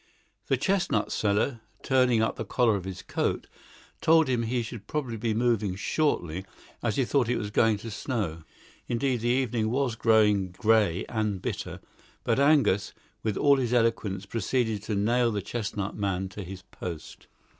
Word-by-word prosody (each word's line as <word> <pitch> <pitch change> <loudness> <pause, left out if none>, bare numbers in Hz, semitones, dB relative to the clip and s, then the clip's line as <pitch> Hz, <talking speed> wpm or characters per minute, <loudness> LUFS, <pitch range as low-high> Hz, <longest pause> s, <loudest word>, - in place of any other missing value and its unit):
The - - +2
chestnut 185 - 0
seller, 110 +4 0 0.2
turning 125 -4 +3
up 110 - 0
the - - -4
collar 115 +1 +2
of 95 -2 -4
his 95 -1 -6
coat, - - -1 0.6
told 160 -1 +5
him 125 -2 +1
he 120 +1 -1
should 110 -2 -8
probably 140 -7 -2
be 110 0 -1
moving 110 -5 +1
shortly, 95 - -1 0.4
as 115 -3 0
he 135 - +2
thought 125 -2 +1
it 125 - +1
was 105 0 -4
going 110 0 +3
to 115 +2 -8
snow. 105 - -3 0.5
Indeed, 125 +1 0
the 120 +2 -1
evening 120 -3 +1
was 130 0 0
growing 105 -4 +3
grey 105 -4 +2
and 110 -4 -1
bitter, - - -5 0.4
but 115 - +1
Angus, 140 -9 +3 0.3
with 110 -2 -1
all 140 -1 +5
his 125 -2 0
eloquence, 110 -5 +1
proceeded 110 +1 -1
to 105 - -2
nail 115 +4 +2
the 105 - -1
chestnut 105 -2 -3
man 95 -2 -1
to 100 +2 -8
his 95 +1 -9
post. 85 -3 -8
110 Hz, 165 wpm, -27 LUFS, 100-125 Hz, 0.6 s, told